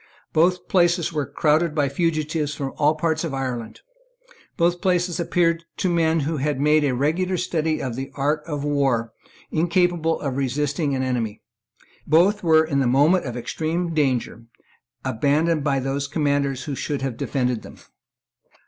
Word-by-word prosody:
Both 180 +2 +2
places 175 -2 +2
were 150 -3 -1
crowded 155 +1 +1
by 145 -2 +2
fugitives 155 0 -1
from 135 -2 -4
all 150 +1 +3
parts 160 0 -1
of 155 -5 -3
Ireland. 125 -4 -4 0.8
Both 175 +1 +1
places 180 -2 +1
appeared 170 -1 +1
to 185 - 0
men 165 -1 +2
who 155 +3 -2
had 145 0 -1
made 150 +1 +3
a 135 -3 +1
regular 175 +8 0
study 160 -3 -1
of 125 -3 -4
the 135 +2 -5
art 150 +2 0
of 145 -3 -3
war 135 -6 0 0.4
incapable 170 0 +1
of 135 -2 -3
resisting 145 +2 -1
an 130 - -1
enemy. 115 -5 -2 0.6
Both 185 +7 +4
were, 160 -2 +5
in 140 -3 0
the 135 - +2
moment 145 +8 +3
of 125 -2 -4
extreme 165 +7 -2
danger, 130 -6 -1 0.6
abandoned 145 +6 +1
by 140 -2 +1
those 135 +2 -2
commanders 140 -3 0
who 140 - -4
should 140 0 -3
have 135 -3 -2
defended 125 -1 -1
them. - - -12
150 Hz, 155 wpm, -23 LUFS, 135-165 Hz, 0.8 s, were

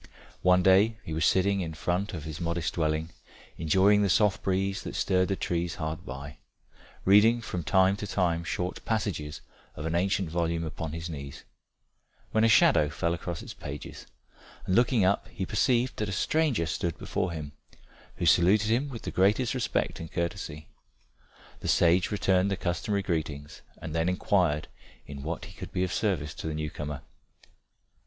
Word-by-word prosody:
One 90 0 +4
day 100 +4 +5
he 80 - -6
was 80 -1 +2
sitting 100 +1 +2
in 80 -3 -4
front 90 +5 -2
of 80 - -6
his 80 +1 -6
modest 85 0 -1
dwelling, 80 0 -1 0.5
enjoying 95 +6 +4
the 100 - +2
soft 105 +2 +3
breeze 95 +1 0
that - - -7
stirred 95 -1 +2
the 95 - 0
trees 85 -1 -2
hard 80 -2 -5
by, 70 +3 -8 0.7
reading 105 +5 +6
from 90 -6 -4
time 95 +1 +4
to 105 - -5
time 85 -4 0
short 90 +2 -3
passages 100 -9 -2 0.3
of 75 - -6
an 80 - -1
ancient 95 +1 +1
volume 85 0 0
open - - -3
upon 80 +1 -6
his 80 0 -4
knees, 70 -4 -8 0.9
when 110 - +2
a - - +6
shadow 75 -8 +5
fell 85 +2 -1
across 85 0 -5
its - - -8
pages, - - -8 0.6
and 95 - -1
looking 120 -2 +4
up, 100 +2 +1
he 95 - -5
perceived 120 +4 +1
that 105 -1 -2
a - - -3
stranger 145 - +1
stood 85 +1 -2
before 90 - -2
him, 75 -3 -6 0.6
who - - -3
saluted 105 +5 +4
him 130 +5 +1
with 120 -4 -8
the - - -4
greatest 105 +6 +2
respect 125 -3 -1
and 80 - -8
courtesy. 85 -3 -4 0.9
The - - -6
sage 90 +1 +4
returned 95 -2 +2
the 100 - -1
customary 100 +3 -1
greetings, 80 -4 -3 0.2
and 80 - -7
then 80 +2 +1
inquired 90 -5 +1 0.4
in 70 -1 -8
what 80 +4 -4
he - - -12
could - - -9
be 90 - 0
of 90 - -2
service 85 -9 -1
to - - -6
the 80 - -3
new 75 -1 -3
comer. 75 -3 -5
90 Hz, 175 wpm, -28 LUFS, 80-100 Hz, 0.9 s, reading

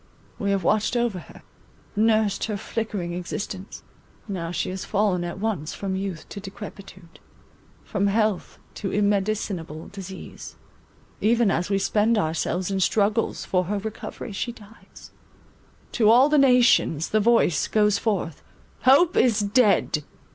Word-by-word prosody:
We 200 - -1
have 195 -2 0
watched 215 +6 +1
over 235 -6 0
her; - - -14 0.5
nursed 215 -1 +2
her 215 -2 -3
flickering 205 -5 -4
existence; 185 +2 -6 0.4
now 180 -5 -4
she 175 - -2
has 190 0 -5
fallen 200 -4 0
at 175 0 -5
once 195 -7 -3
from 195 -1 -3
youth 190 -4 -5
to 200 - -7
decrepitude, 195 -3 -11 0.6
from 200 -1 -1
health 215 -1 0 0.2
to 200 - -2
immedicinable 200 -6 -1
disease; 190 -1 -9 0.7
even 230 -1 +3
as 175 +2 -1
we 200 - +2
spend 215 +3 +2
ourselves 175 +1 -1
in 195 - 0
struggles 210 +3 +1
for 180 -1 0
her 205 +4 -2
recovery, 215 +2 -6
she 220 +4 -3
dies; 220 -1 -16 0.8
to 215 -4 +3
all 250 +5 +6
nations 250 - +4
the 215 - +2
voice 225 -7 +3
goes 210 -2 +2
forth, 185 -8 -2 0.4
Hope 320 +7 +5
is 230 -4 +3
dead! 200 -7 +2
200 Hz, 135 wpm, -24 LUFS, 190-220 Hz, 0.8 s, all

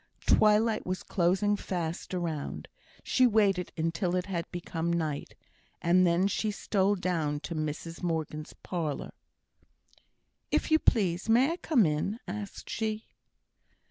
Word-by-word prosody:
Twilight 215 +1 +4
was 185 0 -3
closing 190 +3 +2
fast 175 -2 -4
around; 165 -5 -3 0.4
she 255 -1 +4
waited 200 -5 +2
until 165 +3 0
it 180 0 0
had 175 -4 -3
become 170 -1 -3
night, 155 -4 -2 0.4
and 180 +2 +4
then 175 +3 +3
she 215 +2 -1
stole 200 -1 +1
down 165 -6 -1
to 170 - -5
Mrs 155 +1 -4
Morgan's 160 -3 -3
parlour. 160 -6 -3 1.4
"If - - 0
you 315 - +6
please, 190 - +2
may 250 +7 +5
I 340 - -3
come 265 - +3
in?" 160 +9 -1
asked 205 +2 -6
she. 220 0 -2
180 Hz, 130 wpm, -29 LUFS, 165-210 Hz, 1.4 s, you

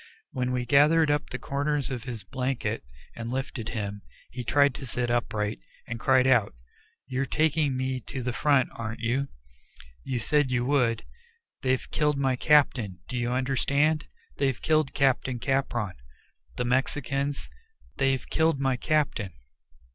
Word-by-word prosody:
When 125 -1 -1
we 125 -1 -1
gathered 150 +4 +5
up 145 0 0
the 125 - -4
corners 140 +1 -1
of 125 -3 -4
his 120 -5 -5
blanket 125 0 -2 0.3
and 115 0 -5
lifted 130 -3 -3
him, 100 -2 -4 0.3
he 125 - -5
tried 140 +3 +4
to 135 - -7
sit 120 0 -1
upright, 105 - -1 0.3
and 115 -1 -5
cried 130 +1 +4
out, 120 - +3 0.5
"You're 130 +1 -2
taking 155 -3 +1
me 130 0 -1
to 130 -2 -4
the 125 0 -2
front, 140 -1 +3
aren't 115 0 -5
you? 125 +4 0 0.8
You 125 - -2
said 145 +4 +2
you 125 -1 0
would. 125 - +1 0.6
They've 130 -1 0
killed 150 -2 +1
my 135 -2 +2
captain 125 -9 +3
do 125 - -5
you 120 0 0
understand? 140 +4 +1 0.3
They've 135 -3 +1
killed 155 -3 +1
Captain 130 -2 +2
Capron. 120 -6 -1 0.6
The 125 - -1
Mexicans! 135 +2 -1 0.5
They've 135 -1 +1
killed 160 -3 +2
my 135 -2 +1
captain." 140 - 0
130 Hz, 145 wpm, -27 LUFS, 120-140 Hz, 0.8 s, gathered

